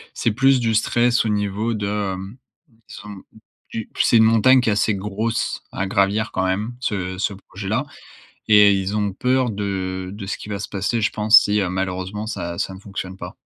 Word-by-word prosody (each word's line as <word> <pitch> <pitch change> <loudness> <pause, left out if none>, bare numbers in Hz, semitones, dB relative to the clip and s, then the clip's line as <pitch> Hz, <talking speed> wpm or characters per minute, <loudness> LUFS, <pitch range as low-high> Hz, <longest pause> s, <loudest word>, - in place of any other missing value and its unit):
c'est 115 - 0
plus 135 +3 +3
du 115 -2 0
stress 120 +3 +2
au 110 - -1
niveau 105 +2 -1
de, 105 -1 -3 0.3
hem 95 +6 -8 0.5
disons, 105 -1 -10 0.5
qu'u 110 -1 -5
c'est 115 - +4
une 110 - +6
montagne 115 +4 +5
qui 120 - 0
est - - +3
assez 105 0 +1
grosse, 105 +4 -2
à 95 - -2
gravir 100 +3 +1
quand 95 - -1
même 105 +6 -2
ce 95 -6 -3
ce 100 - -1
projet 100 0 -9
là, 120 +8 0 0.6
et 105 -1 +7
ils 95 +1 -2
ont 105 -2 -1
peur 130 +3 +1
de 95 -3 -3
de 100 -1 -8
ce 95 - -3
qui 105 - -10
va 100 - -3
se 100 - -6
passer, 100 +4 -1
je 105 - +1
pense, 110 +1 +6
si 105 0 +1
malheureusement 95 +3 -3
ça 85 -6 -5
ça 95 - -2
ne - - -10
fonctionne 95 -2 -7
pas. - - -9
105 Hz, 200 wpm, -21 LUFS, 95-110 Hz, 0.6 s, et